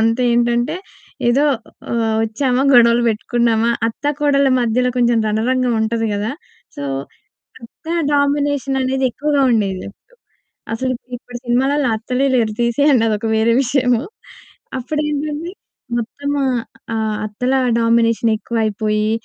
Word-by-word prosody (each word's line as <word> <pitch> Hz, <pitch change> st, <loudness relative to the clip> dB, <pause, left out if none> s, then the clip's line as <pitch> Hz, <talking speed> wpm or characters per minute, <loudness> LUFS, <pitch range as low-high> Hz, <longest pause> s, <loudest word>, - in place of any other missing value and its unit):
వీళ్ళంతా 230 Hz, +3 st, +2 dB
ఏంటంటే 240 Hz, +4 st, +1 dB, 0.5 s
ఏదో 275 Hz, +5 st, +3 dB, 0.5 s
ఆహ్, 225 Hz, -2 st, 0 dB
వచ్చామా 250 Hz, +3 st, 0 dB
గొడవలు 235 Hz, 0 st, +6 dB
పెట్టుకున్నామా 235 Hz, +1 st, +1 dB, 0.2 s
అత్తా, 285 Hz, +6 st, -2 dB
కోడళ్ళ 280 Hz, -2 st, +3 dB
మధ్యలో 245 Hz, +2 st, +1 dB
కొంచెం 240 Hz, -1 st, +3 dB
రణరంగం 245 Hz, +3 st, +1 dB
ఉంటది 225 Hz, +1 st, 0 dB
గదా! 210 Hz, +4 st, -2 dB, 0.4 s
సో -, -, -5 dB, 0.8 s
అత్త 230 Hz, -, -16 dB, 0.3 s
డామినేషన్ 285 Hz, -1 st, +1 dB
అనేది 265 Hz, +1 st, 0 dB
ఎక్కువగా 290 Hz, +3 st, 0 dB
ఉండేది 195 Hz, -4 st, 0 dB
అప్పుడు. -, -, -28 dB, 0.6 s
అసలు 255 Hz, +3 st, -1 dB
ఇప్పుడు 250 Hz, +1 st, -12 dB
ఇప్పుడు 245 Hz, 0 st, -9 dB
సినిమాలల్లో 265 Hz, +3 st, +1 dB
అత్తలే 250 Hz, +5 st, -1 dB
లేరు. 225 Hz, -3 st, +1 dB
తీసేయండి. 250 Hz, +1 st, +3 dB
అదొక 215 Hz, +1 st, -1 dB
వేరే 225 Hz, +1 st, +3 dB
విషయము. 250 Hz, -2 st, +1 dB, 0.8 s
అప్పుడేంటంటే 300 Hz, +4 st, -3 dB, 0.5 s
మొత్తం 285 Hz, +5 st, -4 dB, 0.2 s
ఆహ్, 245 Hz, -3 st, 0 dB, 0.3 s
ఆహ్, 220 Hz, -1 st, -1 dB
అత్తల 250 Hz, +5 st, -2 dB, 0.3 s
డామినేషన్ 230 Hz, 0 st, +2 dB
ఎక్కువ 235 Hz, +2 st, -6 dB
అయిపోయి 215 Hz, 0 st, 0 dB
240 Hz, 120 wpm, -18 LUFS, 225-270 Hz, 0.8 s, గొడవలు